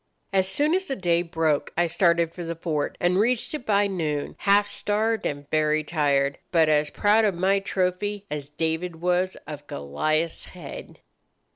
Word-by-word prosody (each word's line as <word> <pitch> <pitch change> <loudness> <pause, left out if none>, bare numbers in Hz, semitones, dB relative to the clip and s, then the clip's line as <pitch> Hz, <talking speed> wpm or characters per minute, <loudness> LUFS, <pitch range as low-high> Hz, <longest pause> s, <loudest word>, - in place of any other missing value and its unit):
As 190 -1 +3
soon 300 +8 +3
as 380 +1 0
the 270 - -2
day 175 -4 +1
broke 160 -3 0
I 175 - +3
started 170 -1 +2
for 175 - -6
the 170 0 -4
fort, 155 -3 -2
and 180 +2 +2
reached 235 +5 +1
it 300 -5 -6
by 205 -1 +3
noon, 155 -7 -2
half 205 0 +4
starved 215 +2 0
and 145 0 -5
very 155 0 +2
tired, 140 -3 +1
but 160 -3 +4
as 150 -1 +2
proud 210 +2 +3
of 205 -4 +2
my 190 +3 +2
trophy 195 +2 -2
as 145 -1 -4
David 160 +3 -2
was 180 +2 0
of 145 -1 -9
Goliath's 155 - -2
head." 170 -6 -10
175 Hz, 170 wpm, -25 LUFS, 155-200 Hz, -, half